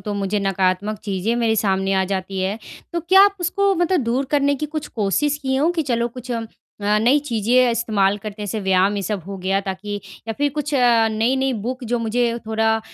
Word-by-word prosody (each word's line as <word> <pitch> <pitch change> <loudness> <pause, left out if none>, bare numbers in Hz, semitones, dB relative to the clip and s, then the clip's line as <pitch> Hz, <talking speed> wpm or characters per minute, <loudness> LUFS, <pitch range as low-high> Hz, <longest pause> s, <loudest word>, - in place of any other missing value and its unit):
तो 210 -2 -4
मुझे 200 +1 -1
नकारात्मक 195 +2 0
चीज़ें 200 +3 -1
मेरे 225 -2 +1
सामने 195 -1 +1
आ 190 - +2
जाती 190 0 -4
हैं, 195 +3 -1 0.3
तो 340 - -1
क्या 375 +4 +5
आप 400 0 +1
उसको 395 +3 +1
मतलब 350 0 +1
दूर 245 +4 0
करने 285 -1 +2
की - - +1
कुछ 305 -1 -3
कोशिश 260 +8 0
किए 265 -1 0
हो 315 +5 +3
कि 330 - 0
चलो, 240 -4 0
कुछ 250 +1 -10
हम 230 -1 -2 0.3
अ, 210 +1 +2
नई 245 +7 +4
चीज़ें 240 +1 +3
इस्तेमाल 210 -4 +1
करते 210 0 -7
हैं, - - -4
जैसे 215 +2 -3
व्यायाम, 190 +1 +2
ये 200 - -2
सब 200 -1 -3
हो 195 0 -6
गया, 195 +1 +1
ताकि 205 +2 -4 0.3
या - - 0
फिर 290 0 +1
अ, - - -20
कुछ 295 -1 -2
नई-नई 245 +1 +2
बुक, 255 0 -4
जो 240 +1 -1
मुझे 235 +1 0
थोड़ा 220 0 +1
अ, - - -4
225 Hz, 225 wpm, -21 LUFS, 200-265 Hz, 0.3 s, क्या